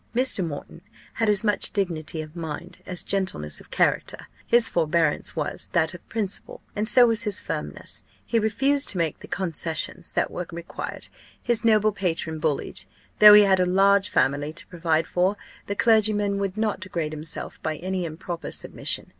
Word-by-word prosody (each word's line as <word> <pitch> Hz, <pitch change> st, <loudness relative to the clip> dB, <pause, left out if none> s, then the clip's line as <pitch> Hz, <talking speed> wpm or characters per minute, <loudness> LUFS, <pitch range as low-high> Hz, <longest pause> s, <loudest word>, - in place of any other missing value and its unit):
Mr. 250 Hz, -6 st, +4 dB
Moreton 165 Hz, +1 st, -7 dB, 0.3 s
had 225 Hz, -2 st, +1 dB
as 210 Hz, +1 st, +5 dB
much 210 Hz, -2 st, +1 dB
dignity 165 Hz, -5 st, -2 dB
of 155 Hz, +1 st, -13 dB
mind 170 Hz, +2 st, -6 dB
as 180 Hz, -1 st, -3 dB
gentleness 185 Hz, -, -1 dB
of -, -, -17 dB
character; -, -, 0 dB, 0.2 s
his 235 Hz, -1 st, +5 dB
forbearance 160 Hz, -2 st, +1 dB
was 150 Hz, -3 st, -2 dB
that 170 Hz, -1 st, +2 dB
of 175 Hz, -, -13 dB
principle, 205 Hz, -4 st, -3 dB, 0.2 s
and 210 Hz, +1 st, -1 dB
so 250 Hz, -1 st, +7 dB
was 225 Hz, -2 st, +2 dB
his 205 Hz, -3 st, 0 dB
firmness: -, -, -5 dB, 0.2 s
he 230 Hz, -, +1 dB
refused 270 Hz, +7 st, +1 dB
to 190 Hz, -, -2 dB
make 165 Hz, -3 st, -1 dB
the -, -, -11 dB
concessions 170 Hz, -1 st, -3 dB
that -, -, 0 dB
were 180 Hz, -1 st, -5 dB
required. 170 Hz, 0 st, -6 dB, 0.4 s
His 235 Hz, -3 st, +1 dB
noble 215 Hz, -1 st, +4 dB
patron 165 Hz, -5 st, -2 dB
bullied. 150 Hz, -2 st, -2 dB, 0.3 s
Though 210 Hz, -1 st, +11 dB
he 210 Hz, -, +9 dB
had 190 Hz, -2 st, +4 dB
a 180 Hz, -, +3 dB
large 195 Hz, +2 st, +4 dB
family 145 Hz, +3 st, +1 dB
to 170 Hz, -, -8 dB
provide 165 Hz, -2 st, 0 dB
for, 185 Hz, +4 st, +1 dB, 0.3 s
the 200 Hz, -, -2 dB
clergyman 210 Hz, -2 st, +3 dB
would 195 Hz, 0 st, -3 dB
not 215 Hz, -1 st, 0 dB
degrade 170 Hz, -5 st, -3 dB
himself 155 Hz, +1 st, -6 dB
by 155 Hz, 0 st, -2 dB
any 185 Hz, +2 st, -3 dB
improper 170 Hz, +1 st, -5 dB
submission. -, -, -2 dB
185 Hz, 170 wpm, -25 LUFS, 165-210 Hz, 0.4 s, Though